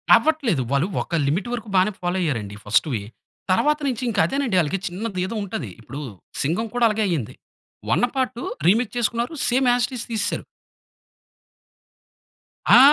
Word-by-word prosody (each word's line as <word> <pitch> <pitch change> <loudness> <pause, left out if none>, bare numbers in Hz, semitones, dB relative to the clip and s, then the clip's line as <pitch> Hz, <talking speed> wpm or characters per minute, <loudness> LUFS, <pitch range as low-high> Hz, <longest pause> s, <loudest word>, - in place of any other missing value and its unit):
అవ్వట్లేదు. 275 - +2
వాళ్ళు 140 +6 +2
ఒక 170 - -3
లిమిట్ 180 +10 0
వరకు 225 -3 -4
బానే 185 +3 +4
ఫాలో 180 +1 0
అయ్యారండి 110 - -2
ఫర్స్ట్‌వి. 110 +3 +2 0.5
తర్వాత 300 +10 +3
నుంచి 255 -1 -2
ఇంకా 205 -2 -1
అదేనండి 270 -8 0
ఆళ్ళకి 175 +5 -1
చిన్నది 185 +1 -3
ఏదో 210 +5 -4
ఉంటది. 150 - -4
ఇప్పుడు 135 +6 -7 0.4
'సింగం' 180 +10 0
కూడా 245 -1 +4
అలాగే 215 0 0
అయింది. 155 - -2 0.6
1 245 - +3
పార్ట్ 255 -2 -1 0.3
రిమిక్ 230 +3 +2
చేసుకున్నారు 235 +4 0 0.2
సేమ్ 255 +1 +3
యాజ్ 245 -1 +2
ఇట్ 265 - -10
ఈజ్ 235 - -5
తీసేసారు. 220 -1 -1 2.3
ఆ! 245 - +10
210 Hz, 150 wpm, -23 LUFS, 165-245 Hz, 2.3 s, ఆ